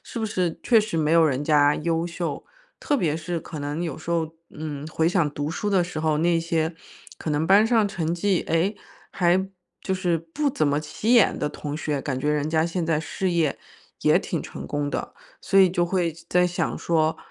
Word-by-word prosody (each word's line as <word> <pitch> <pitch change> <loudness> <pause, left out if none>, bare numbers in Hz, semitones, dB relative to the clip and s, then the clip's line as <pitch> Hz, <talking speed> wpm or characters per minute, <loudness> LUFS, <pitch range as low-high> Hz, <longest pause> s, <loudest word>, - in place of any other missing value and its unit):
是 - - -7
不 225 - -1
是 180 -5 -1
确 230 -3 +5
实 210 -6 -3
没 155 0 +1
有 165 0 +6
人 140 -1 -1
家 145 -1 +4
优 165 +1 -1
秀。 170 -4 -4 0.4
特 290 - +1
别 160 - 0
是 170 +1 -3
可 155 - -8
能 145 +3 -3
有 165 -5 -3
时 165 - -7
候 160 -2 0 0.2
嗯， 150 -2 -6
回 160 0 0
想 170 -5 +1
读 145 +1 -3
书 205 +5 -3
的 185 -3 +3
时 165 -3 -5
候， 155 -1 +1
那 170 +1 +2
些 165 0 -1 0.4
可 - - -6
能 150 +2 0
班 200 +3 +6
上 225 -3 +3
成 170 -5 -2
绩， 185 +2 +1
哎， 175 +6 +1 0.4
还 185 +1 +2 0.3
就 190 - -2
是 180 -3 0
不 165 - -2
怎 155 - 0
么 145 +1 +1
起 210 +10 0
眼 235 - +5
的 150 - -1
同 145 0 -6
学， 150 -2 -2
感 135 -3 -2
觉 145 +3 -2
人 150 +1 -1
家 160 +1 +2
现 170 0 -2
在 160 -2 +1
事 185 +3 -2
业， 165 -4 +1 0.4
也 - - +4
挺 - - -3
成 - - -8
功 145 0 -2
的。 - - -4 0.3
所 195 - +2
以 185 - +6
就 175 -1 +1
会 175 -2 0 0.2
在 180 0 +3
想 180 0 -1
说， 160 -1 +1
165 Hz, 230 characters per minute, -24 LUFS, 155-180 Hz, 0.4 s, 有